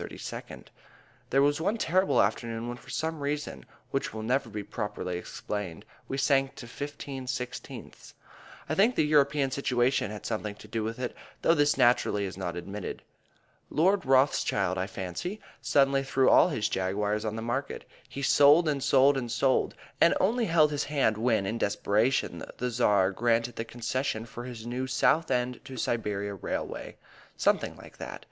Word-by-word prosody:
There 135 Hz, +1 st, +4 dB
was 145 Hz, +2 st, +2 dB
one 205 Hz, +7 st, 0 dB
terrible 185 Hz, -1 st, +3 dB
afternoon 115 Hz, 0 st, -2 dB
when 120 Hz, 0 st, -5 dB
for 135 Hz, -, -16 dB
some 160 Hz, +5 st, -2 dB
reason 145 Hz, +1 st, -4 dB, 0.2 s
which -, -, -1 dB
will 110 Hz, -, -4 dB
never 125 Hz, +2 st, 0 dB
be 105 Hz, -1 st, -5 dB
properly 100 Hz, -4 st, -4 dB
explained 95 Hz, -2 st, -6 dB, 0.2 s
we 135 Hz, -, -3 dB
sank 135 Hz, -1 st, +2 dB
to -, -, -9 dB
15/16. 130 Hz, -1 st, -6 dB, 0.5 s
I 155 Hz, -, -1 dB
think 215 Hz, +9 st, +3 dB
the 155 Hz, -, +3 dB
European 145 Hz, -2 st, +3 dB
situation 125 Hz, -3 st, +1 dB
had 105 Hz, 0 st, -8 dB
something 105 Hz, -2 st, -3 dB
to 105 Hz, -, -14 dB
do 110 Hz, +1 st, -2 dB
with 115 Hz, +1 st, -3 dB
it, 125 Hz, -1 st, -4 dB, 0.3 s
though 165 Hz, -, +5 dB
this 145 Hz, -2 st, +3 dB
naturally 110 Hz, -4 st, +3 dB
is 95 Hz, -, -6 dB
not 90 Hz, -3 st, -4 dB
admitted. 95 Hz, +3 st, -6 dB, 0.7 s
Lord 190 Hz, +6 st, +2 dB
Rothschild, 130 Hz, -8 st, +2 dB
I 95 Hz, 0 st, -2 dB
fancy, 95 Hz, -, -5 dB, 0.2 s
suddenly 135 Hz, -1 st, +3 dB
threw 135 Hz, -1 st, +2 dB
all -, -, +6 dB
his 110 Hz, -9 st, 0 dB
Jaguars 105 Hz, +2 st, -1 dB
on 110 Hz, -1 st, -2 dB
the 110 Hz, -, -4 dB
market; 135 Hz, +4 st, -3 dB, 0.2 s
he 140 Hz, -, -6 dB
sold 145 Hz, +5 st, +6 dB
and 145 Hz, -2 st, 0 dB
sold 140 Hz, +1 st, +5 dB
and 120 Hz, -3 st, -3 dB
sold, 130 Hz, +1 st, +1 dB, 0.3 s
and 170 Hz, -, +6 dB
only 230 Hz, +5 st, +2 dB
held 160 Hz, -4 st, +4 dB
his 145 Hz, -, -1 dB
hand 140 Hz, -7 st, +1 dB
when, 110 Hz, -2 st, +1 dB
in 110 Hz, +4 st, -2 dB
desperation, 105 Hz, +5 st, +1 dB
the 125 Hz, 0 st, -2 dB
Tsar 105 Hz, -5 st, +3 dB
granted 115 Hz, +3 st, +1 dB
the 115 Hz, -, -4 dB
concession 120 Hz, -1 st, -2 dB
for 120 Hz, +1 st, -8 dB
his 120 Hz, -3 st, -8 dB
new 125 Hz, +2 st, -3 dB
Southend 125 Hz, -2 st, +1 dB
to 135 Hz, -2 st, -8 dB
Siberia 105 Hz, -4 st, -2 dB
railway. 95 Hz, -, -5 dB, 0.4 s
Something -, -, +1 dB
like -, -, -14 dB
that. -, -, -7 dB
125 Hz, 165 wpm, -28 LUFS, 110-140 Hz, 0.7 s, all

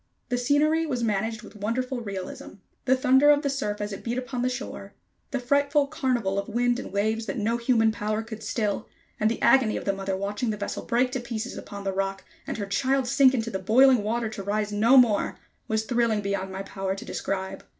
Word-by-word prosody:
The 245 Hz, -, 0 dB
scenery 305 Hz, +5 st, +2 dB
was 250 Hz, -5 st, -2 dB
managed 220 Hz, +1 st, -1 dB
with 215 Hz, -, -13 dB
wonderful 245 Hz, +5 st, -2 dB
realism. 195 Hz, -4 st, -6 dB, 0.3 s
The 260 Hz, -, +4 dB
thunder 265 Hz, +3 st, +5 dB
of 295 Hz, 0 st, +5 dB
the 280 Hz, -, 0 dB
surf 210 Hz, -7 st, -2 dB
as 205 Hz, 0 st, -3 dB
it -, -, -8 dB
beat 240 Hz, +1 st, -2 dB
upon 250 Hz, -1 st, -3 dB
the 250 Hz, -, +1 dB
shore, 255 Hz, +1 st, -6 dB, 0.3 s
the 270 Hz, -, -2 dB
frightful 285 Hz, +3 st, +2 dB
carnival 240 Hz, -8 st, -1 dB
of 200 Hz, -, -5 dB
wind 245 Hz, +1 st, +1 dB
and -, -, -7 dB
waves 220 Hz, +3 st, 0 dB
that -, -, -3 dB
no 225 Hz, +2 st, 0 dB
human 235 Hz, -2 st, +3 dB
power 215 Hz, 0 st, -2 dB
could 220 Hz, -1 st, -8 dB
still, 210 Hz, -4 st, -2 dB, 0.3 s
and 215 Hz, -, +3 dB
the 230 Hz, -, -2 dB
agony 255 Hz, -5 st, +4 dB
of -, -, -6 dB
the 195 Hz, -, +1 dB
mother 195 Hz, -1 st, -3 dB
watching 205 Hz, +4 st, -2 dB
the 210 Hz, -, -2 dB
vessel 205 Hz, -, -4 dB
break 250 Hz, +2 st, +1 dB
to 260 Hz, -, -2 dB
pieces 240 Hz, 0 st, -5 dB
upon 200 Hz, -1 st, -8 dB
the 195 Hz, -1 st, -2 dB
rock 195 Hz, 0 st, -2 dB, 0.2 s
and -, -, -3 dB
her 205 Hz, -, -3 dB
child 260 Hz, +6 st, +1 dB
sink 265 Hz, +1 st, +5 dB
into 230 Hz, -1 st, -2 dB
the 190 Hz, -, -2 dB
boiling 245 Hz, +5 st, +5 dB
water 225 Hz, +2 st, -1 dB
to 215 Hz, -2 st, -6 dB
rise 205 Hz, +1 st, -1 dB
no 225 Hz, +6 st, +5 dB
more, 230 Hz, -5 st, +4 dB, 0.3 s
was 220 Hz, 0 st, 0 dB
thrilling 235 Hz, -3 st, +1 dB
beyond 200 Hz, -1 st, -2 dB
my 190 Hz, +1 st, -5 dB
power 195 Hz, -1 st, -3 dB
to 195 Hz, -, -8 dB
describe. 190 Hz, 0 st, -4 dB
225 Hz, 220 wpm, -26 LUFS, 205-255 Hz, 0.3 s, thunder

